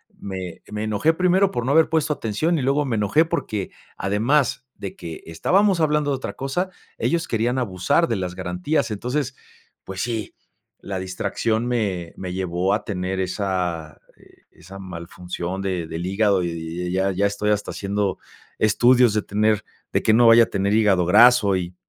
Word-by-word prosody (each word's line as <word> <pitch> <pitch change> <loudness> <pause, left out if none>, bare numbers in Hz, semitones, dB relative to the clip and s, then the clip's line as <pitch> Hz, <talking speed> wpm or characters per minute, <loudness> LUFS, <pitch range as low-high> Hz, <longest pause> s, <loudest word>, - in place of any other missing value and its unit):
me 95 -3 -7
me 105 0 -3
enojé 110 +9 +2
primero 185 +3 +3
por 120 -1 -3
no 130 - +1
haber 160 +1 +5
puesto 155 -2 +1
atención, 150 +8 -1
y - - -1
luego 140 +3 +1
me 125 -4 -1
enojé, 105 +11 +3
porque 110 - -3 0.3
además 120 +8 +1
de 100 - -7
que 80 -2 -8
estábamos 185 - +2
hablando 150 -1 +2
de 135 - 0
otra 130 - -5
cosa, 135 +8 -2 0.3
ellos 170 -1 0
querían 120 +3 0
abusar 125 - +1
de 115 - -1
las 90 -1 -4
garantías. 90 - -1
Entonces 125 +5 -2 0.5
pues, 95 -1 -6
sí 115 -3 -3 0.4
la 95 -1 -5
distracción 110 +5 -2
me 100 -8 -2
me 90 -1 -5
llevó 90 +1 0
a 105 - -1
tener 95 -1 -3
esa, 90 -5 -3 0.2
e - - -22 0.2
esa 95 +3 -11
mal 90 -3 -8
función 90 +1 -5
de 90 -4 -2
del 85 +2 -5
hígado, 100 -1 +2
y 85 - -1
y 85 +2 -5
ya 95 +1 +1
ya 95 +2 0
estoy 105 +1 -1
hasta 105 0 -1
haciendo 100 -1 -2 0.4
estudios 120 +2 +4
de 105 - +1
tener 105 0 +1 0.3
de - - +2
que 110 - +4
no 120 +1 +6
vaya 115 0 +8
a - - +2
tener 100 0 0
hígado 105 -5 +3
graso 105 +1 +6
y 90 0 -5
105 Hz, 180 wpm, -22 LUFS, 95-125 Hz, 0.5 s, vaya